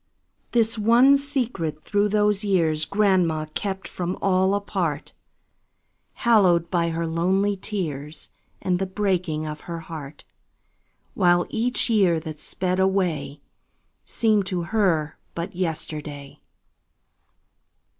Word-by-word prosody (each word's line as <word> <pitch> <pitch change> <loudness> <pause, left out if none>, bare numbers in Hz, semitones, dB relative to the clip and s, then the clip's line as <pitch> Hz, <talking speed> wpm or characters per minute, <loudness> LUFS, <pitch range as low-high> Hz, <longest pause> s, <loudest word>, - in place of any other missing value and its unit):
This 225 -1 +2
one 240 +6 +6
secret 245 - -2
through 205 0 +1
those 210 0 +2
years 165 -6 +1
Grandma 185 -6 +2
kept 195 -1 -3
from 180 0 -4
all 190 0 +2
apart, 180 -7 -3 1.0
Hallowed 185 -8 +3
by 170 -2 +1
her 165 0 -2
lonely 190 +5 +1
tears 160 -7 -5 0.3
And 180 -1 +1
the 190 - -1
breaking 185 -6 -1
of 150 0 -6
her 170 -1 -4
heart; 155 -3 -9 0.9
While 175 0 +3
each 240 +2 +1
year 195 -8 +3
that 155 -2 -7
sped 185 +3 -2
away 175 -7 0 0.6
Seemed 215 -4 +1
to 180 -3 -2
her 170 -8 +1 0.2
but 170 +3 -5
yesterday. 150 -5 -4
185 Hz, 110 wpm, -24 LUFS, 160-205 Hz, 1.0 s, one